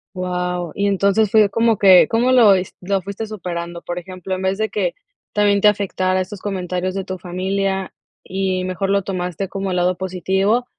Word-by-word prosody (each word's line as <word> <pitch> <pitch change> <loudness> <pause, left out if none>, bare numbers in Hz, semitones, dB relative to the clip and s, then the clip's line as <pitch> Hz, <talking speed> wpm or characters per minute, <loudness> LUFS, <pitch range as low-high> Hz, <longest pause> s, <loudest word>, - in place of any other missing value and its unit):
¡Wao!, 180 -2 -2
y 200 0 0
entonces, 200 +2 +2
fue 210 -1 +5
como 230 +1 +2
que, 190 -2 +7
¿cómo 235 +3 +2
lo 230 -6 +7
es 185 0 -3
lo 195 +2 0
fuiste 200 +3 -5
superando?, 175 -4 -6
por 175 0 -4
ejemplo, 185 +1 -7
en 185 - -6
vez 190 +1 0
de 220 0 -1
que, - - -1 0.4
también 205 -1 +3
te - - +6
afectara 185 -2 +1
estos 185 +1 -5
comentarios 185 -1 -3
de 195 - -2
tu 185 -1 -5
familia, 190 +2 -2 0.3
y 190 -1 -2
mejor 185 +1 -2
lo 200 0 +2
tomaste 180 0 -3
como 195 -1 -3
el 185 - -1
lado 180 +1 +2
positivo, 190 +5 0
190 Hz, 190 wpm, -20 LUFS, 185-200 Hz, 0.4 s, que